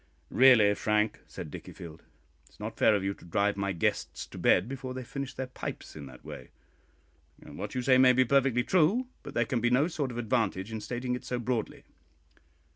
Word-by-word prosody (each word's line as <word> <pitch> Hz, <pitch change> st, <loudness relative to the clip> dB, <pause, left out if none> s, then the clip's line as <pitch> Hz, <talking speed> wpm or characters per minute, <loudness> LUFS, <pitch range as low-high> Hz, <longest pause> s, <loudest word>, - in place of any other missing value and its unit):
"Really, 120 Hz, -6 st, +6 dB
Frank," 105 Hz, +1 st, 0 dB
said -, -, -8 dB
Dickiefield, 80 Hz, -2 st, -9 dB
"it 70 Hz, -2 st, -31 dB
is 75 Hz, -, -25 dB
not 110 Hz, +2 st, -5 dB
fair 110 Hz, -, +4 dB
of 100 Hz, -, -1 dB
you 100 Hz, 0 st, -1 dB
to -, -, -19 dB
drive 100 Hz, +4 st, 0 dB
my 100 Hz, 0 st, -1 dB
guests 85 Hz, -, -2 dB
to -, -, -11 dB
bed -, -, +4 dB
before 130 Hz, -1 st, -6 dB
they 130 Hz, -, -4 dB
have 120 Hz, -, -11 dB
finished 140 Hz, +1 st, -6 dB
their 130 Hz, -, -2 dB
pipes 130 Hz, -, -7 dB
in 75 Hz, -3 st, -8 dB
that 65 Hz, -1 st, -14 dB
way. 65 Hz, -, -9 dB, 0.9 s
What -, -, -7 dB
you 125 Hz, -, -1 dB
say 130 Hz, 0 st, +5 dB
may 130 Hz, -1 st, +7 dB
be 130 Hz, +1 st, +4 dB
perfectly 135 Hz, -1 st, +3 dB
true, 190 Hz, -, +2 dB
but -, -, -10 dB
there 120 Hz, -, +2 dB
can 120 Hz, +1 st, -1 dB
be 120 Hz, -, +2 dB
no 130 Hz, +6 st, +3 dB
sort 150 Hz, -6 st, -2 dB
of 120 Hz, -, -7 dB
advantage 110 Hz, -4 st, -1 dB
in 110 Hz, -1 st, -4 dB
stating 125 Hz, +2 st, -3 dB
it 125 Hz, -, -4 dB
so 125 Hz, -, -3 dB
broadly." 120 Hz, -2 st, -3 dB
120 Hz, 210 wpm, -29 LUFS, 100-130 Hz, 0.9 s, may